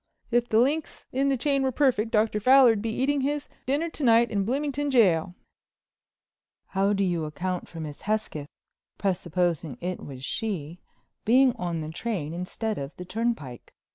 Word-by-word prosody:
"If 240 0 +2
the 220 - +3
links 290 +7 +1
in 275 +2 +1
the 270 - +1
chain 275 +2 +1
were 265 -1 +1
perfect 250 -5 +2
Dr. 215 -1 +2
Fowler'd 250 -2 +6
be 225 - -2
eating 270 +5 0
his 290 +1 -1 0.2
dinner 290 +5 +1
to 305 - -5
night 235 -1 +5
in 200 -2 0
Bloomington 285 +4 -1
Jail." 180 - +3 1.3
"How 195 +1 +1
do 200 -1 +1
you 175 -4 0
account 180 +4 -3
for 165 - -10
Miss 150 -2 -7
Hesketh—presupposing 175 - -3
it 180 +1 -4
was 135 -2 -7
she—being 220 - -1
on 170 -2 -3
the 155 0 -5
train 170 -4 -3
instead 205 +5 -3
of 140 +2 -6
the 180 - -8
turnpike?" 185 - -3
215 Hz, 155 wpm, -26 LUFS, 175-255 Hz, 1.3 s, Fowler'd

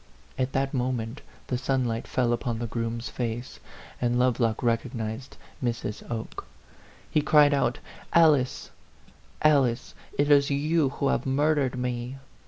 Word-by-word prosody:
At 130 0 -1
that 135 0 0
mo 130 -1 0
ment 120 +2 -4 0.2
the 125 - -2
sunlight 125 -3 -1
fell 120 -2 +1
upon 120 -1 -2
the 120 - -3
groom's 115 +1 -3
face, 120 0 -4 0.4
and 120 0 +1
Lovelock 125 -2 +1
recognized 115 +1 -2 0.3
Mrs. 115 -3 -2
Oke. 115 -2 -5 0.6
He 155 - +3
cried 150 0 +5
out, 125 -3 +1 0.3
'Alice, 150 -6 +3 0.7
Alice, 135 -5 +3 0.2
it 145 +1 +2
is 140 -1 +5
you 150 +1 +2
who 140 0 -1
have 125 - 0
mur 145 +4 +3
dered 135 -3 0
me 125 +1 -3
125 Hz, 140 wpm, -27 LUFS, 120-140 Hz, 0.7 s, cried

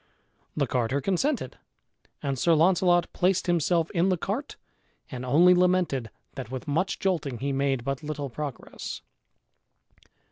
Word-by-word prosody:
The - - +2
carter 125 +2 0
consented, 195 - -1 0.6
and 135 -2 -2
Sir 170 +3 +4
Launcelot 175 +1 +3
placed 185 +1 +1
himself 170 -1 +1
in 180 +1 +2
the 185 - +2
cart 210 - -4 0.6
and 130 -2 -5
only 165 +8 +5
lamented 180 -9 +2 0.2
that 130 -4 -7
with 130 +3 -6
much 165 +7 0
jolting 165 - -1
he 140 +3 -2
made 135 -2 0
but 135 +2 -3
little 150 -2 -4
progress. 145 +1 -6
160 Hz, 135 wpm, -27 LUFS, 135-180 Hz, 0.6 s, only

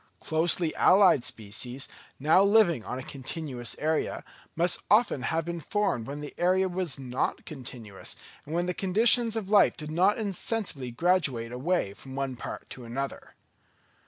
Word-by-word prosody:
Closely 160 +1 +1
allied 185 -9 +5
species, 120 +4 -4 0.3
now 155 +7 +5
living 200 - +4
on 125 - -5
a 130 - -6
continuous 135 -2 -4
area, 155 +1 -1 0.3
must 175 +2 +3
often 210 - +4
have 160 +4 -1
been 170 0 -4
formed 165 - -1
when 145 +1 -6
the 145 - -7
area 185 +2 +3
was 180 -5 -2
not 130 -1 -2
continuous, 120 -8 -7 0.3
and 155 - -4
when 175 +1 +1
the 180 - -1
conditions 225 +5 +3
of 210 -3 -4
life 205 -2 +5
did 155 -2 -6
not 185 +6 +3
insensibly 200 - -2
graduate 130 -5 +1
away 130 - -1
from 130 +5 -11
one 135 -2 -2
part - - -7
to 125 - -8
another. 135 +4 -5
160 Hz, 155 wpm, -28 LUFS, 130-185 Hz, 0.3 s, allied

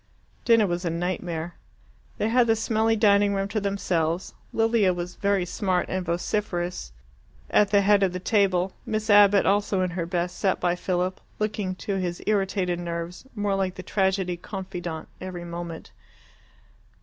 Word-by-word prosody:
Dinner 230 -2 +5
was 175 -1 -2
a 170 - 0
nightmare. 170 0 -3 0.6
They 215 - 0
had 240 +1 +4
the 225 - +4
smelly 225 0 +1
dining 205 -2 +4
room 195 0 -1
to 215 0 -1
themselves. 180 -4 -1 0.2
Lilia, 225 -4 +3
very 180 +2 -1
smart 185 0 -1
and 185 0 -1
vociferous, 175 - -2
was - - -26
at 205 - +4
the 200 0 +4
head 200 0 +4
of 190 -2 +3
the 180 - -4
table; 190 -2 +2
Miss 215 0 -1
Abbott, 205 -1 +6
also 200 -1 +2
in 180 - -1
her 175 -1 -3
best, 175 0 -2
sat 190 -2 +1
by 175 -1 +1
Philip, 180 +1 -2 0.2
looking, 210 -3 -2
to 195 +1 -3
his 175 -2 -3
irritated 195 -4 0
nerves, 170 +3 -5
more 205 -2 0
like 190 -1 -1
the 185 - -7
tragedy 190 -3 0
confidante 175 -4 -6
every 180 -2 -6
moment. 170 -1 -7
185 Hz, 160 wpm, -25 LUFS, 175-205 Hz, 0.6 s, Abbott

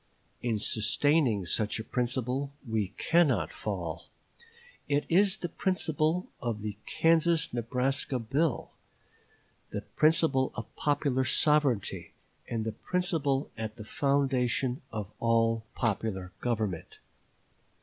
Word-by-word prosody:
In 115 -3 0
sustaining 110 - +2
such 105 +5 0
a - - -4
principle 130 +3 -1 0.2
we 110 -3 0
cannot 170 -5 +2
fall. - - -4 0.8
It 145 0 +1
is 190 +3 +4
the 175 - -3
principle 170 -1 0 0.2
of 115 -4 -3
the 105 -1 -3
Kansas 165 -2 +3
Nebraska 125 +3 0
bill; 135 +5 -1 1.0
the - - -4
principle 155 -4 +2
of 110 - -7
popular 145 -3 +1
sovereignty; 135 -4 +2 0.4
and 115 -2 -2
the 110 - -1
principle 150 - -1
at 110 -1 -5
the 110 -3 -9
foundation 130 -1 +1
of 105 -2 -5
all 115 -1 +2
popular 100 -5 -1
government. 110 -8 -2
125 Hz, 110 wpm, -29 LUFS, 110-150 Hz, 1.0 s, is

